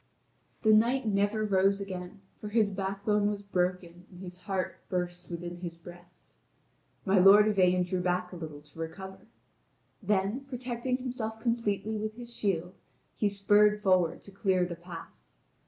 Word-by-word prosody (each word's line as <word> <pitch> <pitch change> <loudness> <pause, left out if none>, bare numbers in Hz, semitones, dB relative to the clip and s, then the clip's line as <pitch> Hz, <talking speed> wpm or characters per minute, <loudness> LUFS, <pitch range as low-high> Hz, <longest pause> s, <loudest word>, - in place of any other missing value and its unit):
The 220 -1 +6
knight 240 +4 +3
never 205 +1 +1
rose 195 0 +3
again, 190 0 -7 0.2
for 210 - -6
his 215 -1 +2
backbone 200 +2 0
was 205 -1 -4
broken 180 -2 -2
and 180 - -14
his 180 -1 -9
heart 185 0 -3
burst 180 -1 -3
within 175 0 -5
his 170 -1 -7
breast. 175 +1 -14 0.7
My 195 -1 +4
lord 200 +3 +8
Yvain 180 -3 +3
drew 180 0 -2
back 180 0 -1
a - - -8
little 155 -4 -7
to 150 +2 -18
recover. 190 +4 -7 0.7
Then 205 +6 0
protecting 250 0 -2
himself 240 -4 -4
completely 220 -2 -1
with 215 +1 -4
his 240 0 -9
shield, 180 -3 -1 0.4
he 210 - +1
spurred 210 +1 +3
forward 185 -4 +2
to 200 - -12
clear 190 -2 +1
the 175 - -5
pass. 170 0 -11
195 Hz, 155 wpm, -30 LUFS, 180-210 Hz, 0.7 s, lord